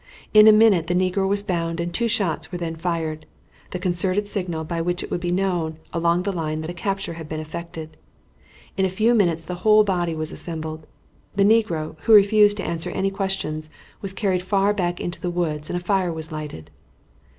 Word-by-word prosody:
In 215 Hz, 0 st, +8 dB
a -, -, +10 dB
minute 215 Hz, -6 st, +5 dB
the 175 Hz, -, 0 dB
negro 185 Hz, +1 st, +1 dB
was 200 Hz, +1 st, +1 dB
bound 170 Hz, -4 st, -2 dB
and 170 Hz, 0 st, -3 dB
two 235 Hz, +4 st, +1 dB
shots 165 Hz, -8 st, 0 dB
were 180 Hz, -, -3 dB
then 165 Hz, -2 st, -4 dB
fired, 160 Hz, -2 st, -3 dB, 0.4 s
the -, -, -4 dB
concerted 185 Hz, +2 st, 0 dB
signal 180 Hz, -6 st, -3 dB
by 165 Hz, +1 st, -3 dB
which 175 Hz, +2 st, -1 dB
it -, -, -8 dB
would -, -, -1 dB
be 175 Hz, 0 st, -1 dB
known 175 Hz, -4 st, -1 dB, 0.2 s
along 170 Hz, +1 st, +1 dB
the 200 Hz, -, -1 dB
line 155 Hz, -2 st, -2 dB
that 160 Hz, +2 st, -5 dB
a -, -, -7 dB
capture 195 Hz, +1 st, -2 dB
had 160 Hz, -2 st, -9 dB
been 155 Hz, -, -4 dB
effected. 160 Hz, 0 st, -7 dB, 0.8 s
In 190 Hz, -, +2 dB
a 190 Hz, -, +2 dB
few 215 Hz, +6 st, +2 dB
minutes 170 Hz, -7 st, +2 dB
the 180 Hz, 0 st, -6 dB
whole 215 Hz, 0 st, +6 dB
body 175 Hz, -4 st, -1 dB
was 155 Hz, 0 st, -4 dB
assembled. 155 Hz, -2 st, -6 dB, 0.5 s
The 200 Hz, -, +3 dB
negro, 200 Hz, -9 st, +1 dB
who 225 Hz, -, +5 dB
refused 205 Hz, 0 st, +6 dB
to 195 Hz, -, -4 dB
answer 165 Hz, -1 st, -2 dB
any 195 Hz, 0 st, -1 dB
questions, 190 Hz, -6 st, -2 dB, 0.3 s
was 195 Hz, -, -3 dB
carried 190 Hz, -2 st, 0 dB
far 195 Hz, +2 st, +2 dB
back 175 Hz, -3 st, -2 dB
into 175 Hz, -, -5 dB
the 180 Hz, -, -2 dB
woods 155 Hz, -4 st, -2 dB
and 175 Hz, -, -1 dB
a 175 Hz, -, -7 dB
fire 190 Hz, -3 st, +1 dB
was 160 Hz, 0 st, -4 dB
lighted. 150 Hz, -, -7 dB
175 Hz, 205 wpm, -23 LUFS, 160-195 Hz, 0.8 s, a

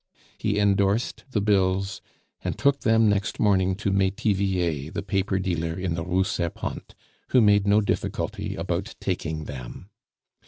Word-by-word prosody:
He 105 Hz, -, 0 dB
endorsed 100 Hz, +2 st, +1 dB
the 110 Hz, -5 st, 0 dB
bills, 95 Hz, -1 st, +1 dB, 0.4 s
and -, -, -2 dB
took 140 Hz, 0 st, +2 dB
them 110 Hz, 0 st, +4 dB
next 100 Hz, 0 st, 0 dB
morning 95 Hz, -3 st, +3 dB
to 100 Hz, 0 st, -1 dB
Metivier, 95 Hz, -5 st, 0 dB
the 100 Hz, -, -4 dB
paper 95 Hz, -1 st, 0 dB
dealer 85 Hz, -3 st, -2 dB
in 90 Hz, -2 st, -2 dB
the 80 Hz, 0 st, -2 dB
Rue 90 Hz, +2 st, +1 dB
Serpente, 90 Hz, -4 st, -4 dB, 0.3 s
who 130 Hz, -, +4 dB
made 105 Hz, -3 st, +4 dB
no 105 Hz, +1 st, +5 dB
difficulty 100 Hz, -, -2 dB
about -, -, -3 dB
taking 80 Hz, 0 st, -3 dB
them. 70 Hz, -, -9 dB
95 Hz, 145 wpm, -25 LUFS, 90-105 Hz, 0.4 s, no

